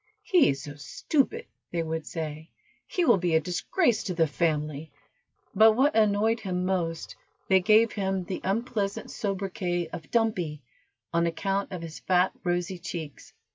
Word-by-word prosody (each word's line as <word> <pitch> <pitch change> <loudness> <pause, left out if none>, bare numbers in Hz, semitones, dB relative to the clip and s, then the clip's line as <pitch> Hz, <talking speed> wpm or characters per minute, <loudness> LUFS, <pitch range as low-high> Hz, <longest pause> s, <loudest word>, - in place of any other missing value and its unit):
"He 360 -6 +4
is 140 0 -2
so 145 - -7
stupid," 305 - -1 0.3
they 170 -1 -1
would 160 -1 -4
say, 155 -1 -5 0.4
"he 355 - 0
will 235 -9 +5
be 175 -2 +1
a - - +6
disgrace 205 - 0
to 185 - -2
the 165 -1 +4
family;" 155 -1 -1 0.6
but 220 +2 +7
what 275 +6 +2
annoyed 220 +1 +3
him 180 -3 -2
most, 170 -3 -2 0.3
they 190 -1 +6
gave 220 +4 +4
him 190 -2 -1
the 185 +1 -5
unpleasant 205 0 -2
sobriquet 185 -4 -2
of 155 - -8
Dumpy, 180 - 0 0.5
on 170 0 +2
account 195 +4 -2
of 180 -3 -5
his 160 -1 -8
fat, 185 0 +2
rosy 175 +1 -1
cheeks. 165 -4 -7
180 Hz, 155 wpm, -27 LUFS, 165-215 Hz, 0.6 s, but